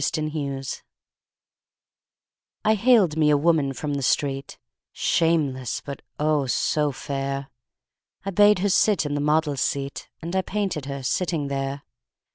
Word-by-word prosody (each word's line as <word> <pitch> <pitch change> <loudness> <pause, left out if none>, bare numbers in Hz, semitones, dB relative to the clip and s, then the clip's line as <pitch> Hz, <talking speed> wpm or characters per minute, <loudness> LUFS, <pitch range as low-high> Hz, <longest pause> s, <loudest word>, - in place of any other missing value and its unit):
My 155 - 0
Madonna 140 -3 -3 2.0
I 215 - +5
haled 215 -7 +4
me 155 -1 +4
a 150 - +5
woman 150 -2 +2
from 145 +2 -4
the 140 - -2
street, 135 +1 -1 0.3
Shameless, 145 -7 0
but, 140 -1 -7 0.2
oh, 150 -2 +1
so 150 +3 +1
fair! 135 0 -4 0.7
I 195 - -2
bade 205 +2 +5
her - - +3
sit 195 -3 +3
in 145 - -2
the 145 - -1
model's 150 -2 +1
seat 140 0 -2
And 170 +3 -5
I 190 - +3
painted 190 -7 -2
her 140 -1 -5
sitting 160 0 -1
there. 135 +1 -3
150 Hz, 140 wpm, -24 LUFS, 140-170 Hz, 2.0 s, I